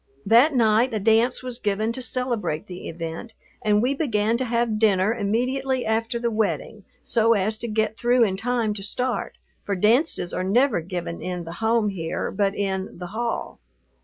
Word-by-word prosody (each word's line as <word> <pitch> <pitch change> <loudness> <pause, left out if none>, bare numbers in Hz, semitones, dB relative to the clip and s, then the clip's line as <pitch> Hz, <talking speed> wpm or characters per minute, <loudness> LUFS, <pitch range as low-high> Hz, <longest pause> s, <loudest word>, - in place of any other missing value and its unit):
That 245 +8 +5
night 225 +1 +3
a - - 0
dance 225 +5 +2
was 250 -1 -4
given 215 +1 0
to 260 - -3
celebrate 245 -11 -2
the 180 0 -8
event 165 +7 -6 0.3
and 210 -1 +2
we 260 +3 +2
began 230 -7 0
to 260 - -2
have 235 -2 0
dinner 205 -1 +3
immediately 250 +5 -1
after 225 +2 0
the 235 0 -1
wedding 215 -1 -2 0.2
so 230 0 +3
as 215 +1 +1
to 235 - -4
get 220 0 0
through 240 +1 +3
in 195 -4 +1
time 225 +1 0
to 205 - -7
start, 250 +5 -2 0.3
for 200 - -2
dances 220 - +2
are - - -1
never 225 +1 +2
given 170 -1 -5
in 180 -1 -4
the 165 0 -8
home 220 -1 +2
here, 165 -5 -3
but 200 0 0
in 190 -1 -3
"the 180 0 -6
hall." 235 +1 -3
220 Hz, 180 wpm, -24 LUFS, 195-240 Hz, 0.3 s, That